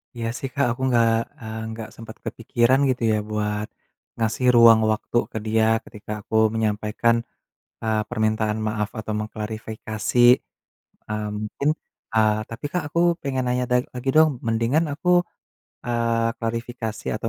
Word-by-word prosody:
Iya, 115 -1 -3
sih, 135 - -4
Kak, 140 - +2
aku 120 - -5
enggak, 120 -2 +4 0.3
eee, 110 -1 -6
enggak 110 -1 -6
sempat 115 -1 -10
kepikiran 120 +2 +2
gitu, 130 -1 -1
ya, - - +2
buat 105 0 -1 0.5
ngasih 115 +3 0
ruang 115 -1 +8
waktu 110 +2 -1
ke - - -4
dia 110 0 +2 0.2
ketika 105 0 -11
aku 110 - -6 0.2
menyampaikan, 110 +1 +1 0.7
eee, 110 -1 +1
permintaan 110 0 0
maaf 105 -1 -1
atau 110 0 -4
mengklarifikasi. 110 0 -5 0.9
Eee, 105 0 -2
mungkin, 110 +7 -2 0.5
eee, 110 -1 +4
tapi, 115 - -9
Kak, 180 - 0
aku 170 +3 0 0.2
pengen 130 -2 -1
nanya 125 0 +1
da 125 - +4 0.2
lagi 125 +1 -4
dong. 155 0 +7 0.2
Mendingan 115 +8 +2
aku, 155 +5 -4 0.8
eee, 115 -1 +1
klarifikasi 115 -1 -4
atau 115 - -3
115 Hz, 140 wpm, -23 LUFS, 110-120 Hz, 0.9 s, ruang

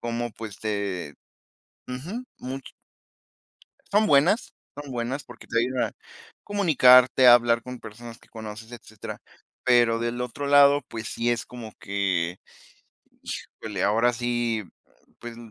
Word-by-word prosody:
Como, 120 0 -3
pues, 105 -2 -8
de 100 -8 -3 0.7
ujú, 175 - -6
much 130 +1 -6 1.3
Son 210 +1 +4
buenas, 155 - +3 0.2
son 145 -1 -8
buenas, 125 +4 -3
porque 125 - -14
te 115 - 0
ayudan 125 +1 0
a - - -25 0.5
comunicarte, 130 -10 +5
a 120 - +11
hablar 120 -1 +3
con 125 -1 -8
personas 115 +2 -10
que - - -23
conoces, 110 +1 -9
etcétera. 110 -2 -9 0.5
Pero 120 -2 +4
del 120 +1 -3
otro 125 +3 -4
lado, 145 0 +6
pues 115 -1 -6
sí 120 +1 -1
es 120 - -1
como 115 -3 -9
que 95 -3 -1 0.9
híjole, 105 -4 -6
ahora 115 +5 +3
sí, 120 -2 -1 0.6
pues 120 -1 -9
120 Hz, 130 wpm, -25 LUFS, 110-130 Hz, 1.3 s, a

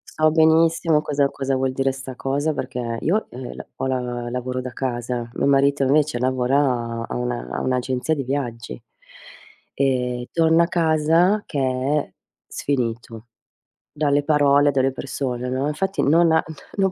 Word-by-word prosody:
so 155 0 +3
benissimo 160 0 +3
cosa 145 -2 +1
cosa 135 -1 -2
vuol 130 0 0
dire 135 0 +1
sta 135 -1 -8
cosa, 145 +4 -1
perché 125 -3 -4
io, 210 +6 0
eh, 125 0 -8
la - - -9
ho - - -3
la 125 -2 -3
lavoro 125 +1 -3
da 130 -1 -6
casa. 120 -2 -3
Mio - - -1
marito 140 0 +3
invece 145 0 +2
lavora 125 -2 0
a - - -6
una - - -3
un'agenzia 130 +3 -1
di 140 - -3
viaggi 125 -3 -4 0.9
e 125 -2 -1
torna 165 0 +4
a - - 0
casa 165 +4 +2
che 145 - -4
è 130 +3 0 0.3
sfinito 115 -4 -3 0.6
dalle 145 -1 +1
parole, 145 -1 +4
delle 135 -1 +1
persone, 125 -1 -4
no, 130 +3 -1
infatti 190 +6 -1
non 165 +3 +4
ha 160 - +3 0.3
no 195 -2 +2
135 Hz, 150 wpm, -22 LUFS, 125-150 Hz, 0.9 s, torna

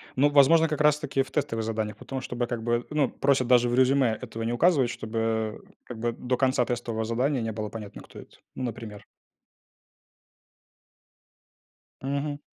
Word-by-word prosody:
Ну, 140 +3 +4
возможно, 155 +3 +5
как 150 -1 -2
раз 150 0 +4
таки 140 -3 -1
в - - -16
тестовых 115 -7 -1
заданиях, 110 -2 -3
потому, 130 +3 -6
чтобы, 120 -1 -3
как 115 -2 -4
бы, 120 0 0
ну, 150 -3 +1
просят 135 -3 +1
даже 120 -1 +4
в 120 - 0
резюме 130 -3 +3
этого 115 - -6
не 115 +1 -1
указывать, 140 -4 +3
чтобы, 110 -1 -2 0.2
как 120 -3 -9
бы, 120 +1 0
до 125 +2 -2
конца 130 -2 +2
тестового 115 -2 -3
задания 125 +3 0
не 115 - -2
было 105 0 -4
понятно, 105 -2 -8
кто - - -13
это. - - -15 0.2
Ну, 130 - -4
например. 115 -3 -6 3.0
Мгм. 140 +2 -3
120 Hz, 165 wpm, -26 LUFS, 115-140 Hz, 3.0 s, возможно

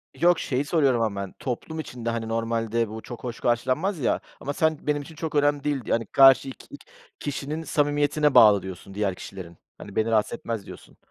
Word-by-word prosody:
Yok, 175 0 +3
şeyi 135 +2 -1
soruyorum 140 -6 +2
ama 100 -3 -1
ben, 100 - -6
toplum 145 +5 -4
içinde, 120 -6 -5
hani, 115 -1 -3
normalde 115 0 -1
bu 110 +1 -7
çok 120 +1 -9
hoş 120 -1 -5
karşılanmaz, 130 - 0
ya, 125 - +1 0.2
ama 145 - -4
sen 160 +1 +1
benim 145 -1 +1
için 160 +3 -12
çok 155 -1 -5
önemli 145 -1 +2
değil, 145 -2 -1
yani, 115 0 0
karşı 135 +3 +6
ik - - -11
ik - - -12
i - - -38 0.3
kişinin 145 +2 -4
samimiyetine 145 -1 +1
bağlı 105 -3 +8
diyorsun 95 +1 -9
diğer 100 -2 -1
kişilerin. 85 -2 -9 0.2
Hani, 100 - -11
beni 110 +1 +1
rahatsız 110 -1 +2
etmez 115 -4 -4
diyorsun. - - -13
125 Hz, 200 wpm, -25 LUFS, 115-145 Hz, 0.3 s, bağlı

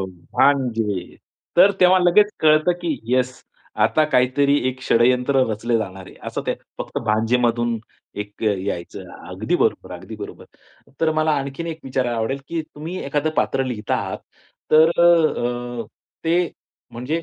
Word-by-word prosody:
हो. 95 - -2 0.3
भांजे. 115 -9 +1 0.4
तर 200 +3 +7
तेव्हा 185 +1 +6
लगेच 180 +3 +5
कळतं 155 +2 +4
की 160 -6 -1
येस, 130 0 0 0.4
आता 115 +8 +3
काहीतरी 140 +3 +3
एक 130 0 -5
षड्यंत्र 125 +2 +3
रचलं 115 +2 0
जाणार 95 -3 -6
आहे, - - -13
असं - - -4
ते - - 0 0.2
फक्त - - -4
भांजेमधून 115 +1 +1 0.4
एक 105 +2 -17
अ, 105 -1 +3
यायचं. 95 -2 -5 0.2
अगदी - - -1
बरोबर, - - 0
अगदी - - -9
बरोबर. - - -9 0.6
तर 160 -1 +3
मला 155 0 +1
आणखीन 140 +4 -5
एक 165 -1 -5
विचारायला 130 -2 -1
आवडेल, 115 +5 -1
की 165 -1 -2
तुम्ही 155 +4 -8
एखादं 145 +2 0
पात्र 135 - +1
लिहता 115 -5 -2
आहात - - -3 0.5
तर 160 +1 +7 0.9
अ, - - -13 0.4
ते 170 +1 +2 0.4
म्हणजे 130 +8 -3
130 Hz, 145 wpm, -21 LUFS, 115-155 Hz, 0.9 s, तर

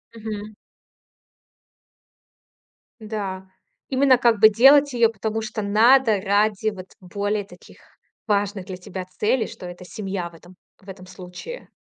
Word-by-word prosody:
Мгм. 215 -1 -7 2.5
Да, 200 -3 -5 0.4
именно 265 -1 +4
как 235 -3 +2
бы 215 +1 +8
делать 275 +6 +5
её, 235 -2 +4
потому 220 +1 -3
что 215 0 -5
надо 220 +2 +4
ради 205 +2 +1
вот 185 -2 -11
более 205 +3 -3
таких 180 -2 -17 0.5
важных 200 -2 -1
для 185 -1 -7
тебя 180 0 -7
целей, 215 +6 -1
что - - -11
это 175 +1 -10
семья 190 -2 -5
в - - -24
этом 175 +2 -17 0.3
в 195 - -15
этом 185 -1 -10
случае. 185 - -10
205 Hz, 130 wpm, -22 LUFS, 190-225 Hz, 2.5 s, бы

